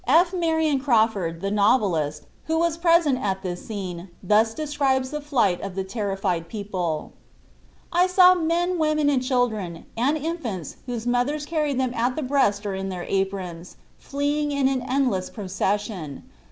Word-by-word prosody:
F. 340 +7 +4
Marion 320 -5 +1
Crawford, 220 - +1
the 195 0 -2
novelist, 185 - +1 0.2
who 320 0 0
was 335 -1 +1
present 335 -5 +3
at 190 -1 -2
this 175 -1 -4
scene, 185 -4 -5
thus 220 +4 +3
describes 275 -4 0
the 300 0 -3
flight 235 -11 +1
of 195 -2 -6
the 190 - -1
terrified 195 -4 -2
people: 185 -7 -3 0.8
"I 355 +2 +4
saw 365 0 +7
men, 350 +1 0
women 305 -2 +2
and 265 -3 +2
children 225 -10 -1
and 270 +7 +1
infants, 275 - -4
whose 240 -2 -4
mothers 250 +5 0
carried 300 -4 -1
them 255 -2 0
at 245 +2 0
the 310 - -2
breast 250 -7 +1
or 200 - -2
in 190 0 -3
their 180 -2 -5
aprons, 190 -3 -3 0.2
fleeing 290 +1 -1
in 280 -2 +2
an 265 -1 0
endless 250 -7 0
procession. 195 - -3
245 Hz, 155 wpm, -24 LUFS, 195-295 Hz, 0.8 s, saw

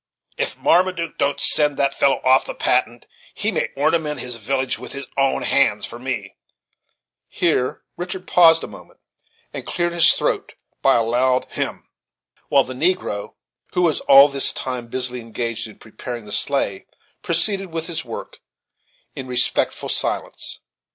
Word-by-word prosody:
If - - -2
Marmaduke 175 -2 +1
don't 140 0 0
send 150 -2 +3
that 140 0 +2
fellow 140 -1 +2
off 130 +1 +4
the - - -6
Patent, 120 -1 0 0.3
he - - -1
may - - 0
ornament 150 +1 0
his 125 -2 -5
village 130 +3 -2
with - - -9
his 140 0 -6
own 135 -1 +1
hands - - +3
for 120 - -8
me," 120 -6 -5 0.9
Here 155 -7 0
Richard 185 +1 -5
paused 165 -2 +5
a - - -5
moment, - - -14 0.5
and - - -5
cleared 175 -1 -2
his 170 -2 +6
throat - - -2 0.3
by 135 - +4
a 115 - +3
loud 125 +3 +1
hem, - - -4 0.6
while 140 -1 +4
the 130 - -7
negro, 140 - -1 0.4
who 180 - +1
was 160 -4 +2
all 140 +1 +7
this 140 -1 0
time 125 -2 -5
busily 125 0 -2
engaged 115 0 -4
in 110 - -14
preparing 115 +1 -8
the 105 - -9
sleigh, 105 -6 0 0.3
proceeded 195 +4 0
with 165 -1 -4
his 165 -2 -4
work 115 -2 -8 0.8
in 130 - -6
respectful 125 -1 0
silence. - - -1
135 Hz, 155 wpm, -21 LUFS, 125-165 Hz, 0.9 s, all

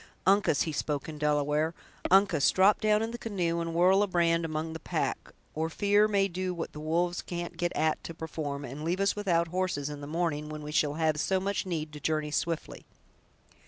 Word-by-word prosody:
Uncas"—he 190 -5 +3
spoke 145 -1 -2
in 155 -2 -7
Delaware—"Uncas, 150 +4 +2
drop 195 +2 +4
down 215 0 +3
in 225 - -3
the 240 - -6
canoe, 175 -7 -1
and 165 0 -4
whirl 185 +3 +5
a 205 - +2
brand 170 -2 +2
among 160 0 -3
the 160 - -6
pack; - - -3 0.2
or 160 +1 -1
fear 205 +4 +3
may 200 -2 +2
do 185 0 -3
what 165 - -4
the 150 - -8
wolves 170 +3 0
can't 175 0 -5
get 175 0 -1
at 155 0 +1
to 165 - -7
perform, 145 -3 -4
and 140 +5 -7
leave 175 +4 -1
us 195 0 +2
without 170 -5 +1
horses 175 -5 -1
in 145 -1 -7
the 145 - -7
morning, 155 -2 -1
when 155 0 -6
we 150 - -6
shall 150 -1 +1
have 155 -1 +1
so 190 +4 +1
much 195 0 -2
need 155 -4 -3
to 150 - -7
journey 155 0 -1
swiftly!" 165 +1 -2
165 Hz, 200 wpm, -29 LUFS, 150-185 Hz, 0.2 s, whirl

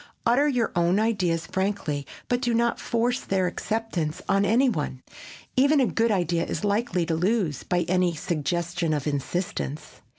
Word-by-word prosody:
Utter 250 +6 +4
your 250 -5 +1
own 175 +3 +3
ideas 185 -7 +1
frankly 190 -8 -2 0.2
but 245 0 0
do 240 -2 +1
not 235 +1 +1
force 240 +2 0
their 190 -1 0
acceptance 180 -5 -2
on 195 +1 +3
any 235 +7 +4
one. 145 - -2 0.5
Even 280 +3 +4
a 260 - +4
good 230 0 +1
idea 175 -4 +1
is - - -4
likely 200 -4 +1
to 165 - -1
lose 180 - 0
by 180 -1 0
any 180 0 +1
suggestion 170 +1 -1
of 145 - -3
insistence. 150 +1 -3
185 Hz, 160 wpm, -25 LUFS, 165-230 Hz, 0.5 s, Utter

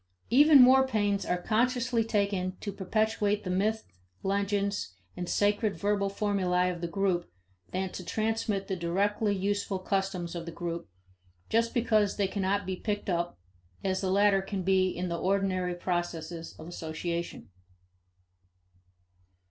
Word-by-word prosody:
Even 290 +3 +8
more 265 +1 +6
pains 205 -5 0
are 180 - 0
consciously 240 +3 +1
taken 200 -4 -1
to 205 - -4
perpetuate 210 +1 0
the 185 - -3
myths, 215 +4 0 0.4
legends, 200 - -1 0.2
and 180 -1 -4
sacred 205 0 +1
verbal 200 -1 +1
formulae 185 -3 +1
of 175 -1 -7
the 170 - -1
group 180 - 0 0.4
than 190 0 -2
to 185 - -7
transmit 215 0 -1
the 190 - -1
directly 200 +4 0
useful 200 0 -1
customs 185 -2 -2
of 170 -1 -6
the - - -4
group 170 - -5 0.6
just 230 +1 +2
because 220 -4 +2
they 200 -2 +2
cannot 200 0 -1
be 190 0 -2
picked 205 0 -3
up, 170 - -1 0.5
as 190 0 0
the 190 - -1
latter 200 0 +4
can 195 -1 -4
be 185 0 +3
in 180 0 -3
the 170 -1 -3
ordinary 185 -2 0
processes 175 -2 -3
of 160 - -10
association. 170 - -5
195 Hz, 140 wpm, -29 LUFS, 180-205 Hz, 0.6 s, Even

